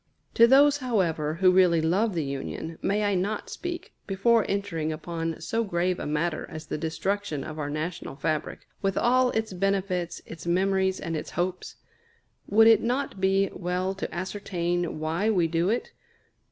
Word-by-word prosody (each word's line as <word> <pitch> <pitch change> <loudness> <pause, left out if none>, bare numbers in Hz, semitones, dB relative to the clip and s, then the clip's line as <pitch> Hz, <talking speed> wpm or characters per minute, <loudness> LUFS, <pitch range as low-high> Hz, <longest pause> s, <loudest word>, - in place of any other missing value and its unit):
To 230 - +7
those, 285 +3 +6
however, 175 - 0
who 185 +1 +5
really 180 -2 +5
love 185 +6 +1
the 165 - 0
Union, 140 +4 -5
may 210 +2 +1
I 205 -1 +1
not 195 +3 -2
speak, 350 0 -6
before 220 +4 +3
entering 170 -6 -1
upon 165 +1 -4
so 230 0 -1
grave 180 -2 0
a - - -4
matter 155 +2 -1
as 155 0 -8
the - - -4
destruction 165 -1 -2
of 155 +2 -7
our 145 -1 -2
national 155 +1 -4
fabric, 155 +1 -3
with 195 -1 0
all 255 +1 +3
its 220 -4 -2
benefits, 185 -2 -1
its 165 +1 -9
memories, 190 +1 +1
and 165 - -3
its 155 - -4
hopes? 180 +1 -3 0.7
Would 225 +2 +5
it 225 -2 +7
not 250 -4 -2
be 195 0 +2
well 180 +1 -2
to 195 - -5
ascertain 175 -2 -2
why 165 +7 0
we 180 -6 +3
do 170 +3 +1
it? 235 +3 -1
185 Hz, 165 wpm, -27 LUFS, 165-205 Hz, 0.7 s, To